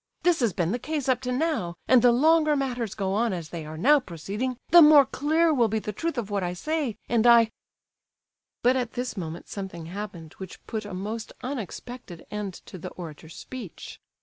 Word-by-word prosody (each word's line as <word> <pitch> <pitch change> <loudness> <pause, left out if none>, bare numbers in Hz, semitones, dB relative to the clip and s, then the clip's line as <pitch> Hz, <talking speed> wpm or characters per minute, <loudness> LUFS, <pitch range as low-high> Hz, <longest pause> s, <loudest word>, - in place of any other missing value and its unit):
This 350 -2 +3
has 235 -5 +2
been 175 -2 -1
the 245 - -1
case 300 +1 -3
up 255 -1 +2
to 250 -1 -3
now, 250 - -1
and 255 -2 +6
the 245 0 +6
longer 305 +4 +4
matters 250 -6 -2
go 195 -2 -1
on 225 +1 +1
as 170 -3 -5
they 165 -3 -6
are 155 +1 -7
now 285 - +5
proceeding, 210 - -4
the 345 +1 +9
more 300 -2 +8
clear 315 +5 +2
will 240 -5 +3
be 220 +1 -1
the 210 0 -4
truth 325 - -3
of 215 -4 -3
what 200 -1 0
I 180 -1 -2
say; 285 - -2
and 235 0 +3
I—" 230 -2 +6 1.1
But 250 +2 +4
at 245 -2 -2
this 245 -1 -3
moment 170 -3 -6
something 190 -5 -6
happened 175 -3 -7
which 190 -2 -9
put 215 -2 -4
a 205 -3 -6
most 215 +4 -5
unexpected 245 -6 -7
end 205 -3 -4
to 185 - -10
the 180 - -6
orator's 160 -2 -10
speech. 245 -9 -9
230 Hz, 200 wpm, -26 LUFS, 185-260 Hz, 1.1 s, the